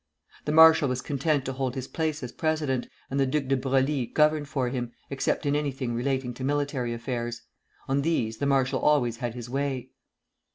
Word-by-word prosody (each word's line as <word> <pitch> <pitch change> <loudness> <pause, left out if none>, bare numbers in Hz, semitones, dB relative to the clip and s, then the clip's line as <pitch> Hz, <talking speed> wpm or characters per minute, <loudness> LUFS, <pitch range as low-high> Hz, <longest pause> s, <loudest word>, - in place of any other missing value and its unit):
The 150 - 0
marshal 160 -2 +7
was 125 0 -1
content 140 +1 0
to 135 - -3
hold 130 -1 -2
his 130 -1 -4
place 155 -3 -2
as 125 - -5
president, 155 -6 -1 0.2
and 135 - 0
the 135 - +3
Duc 145 +2 0
de 135 +1 +2
Broglie 135 0 +1
governed 150 +1 +2
for 135 -4 -1
him, 120 -2 -4 0.2
except 140 +3 -1
in 145 0 +2
anything 135 -4 -2
relating 130 +1 -1
to 130 - -7
military 140 -3 -1
affairs. 120 0 -4 0.4
On 135 +1 +1
these 125 -8 0
the 140 - -1
marshal 135 -1 +2
always 125 -6 +2
had 120 -1 -4
his 120 -1 -6
way. 130 -1 -2
135 Hz, 190 wpm, -27 LUFS, 125-145 Hz, 0.4 s, marshal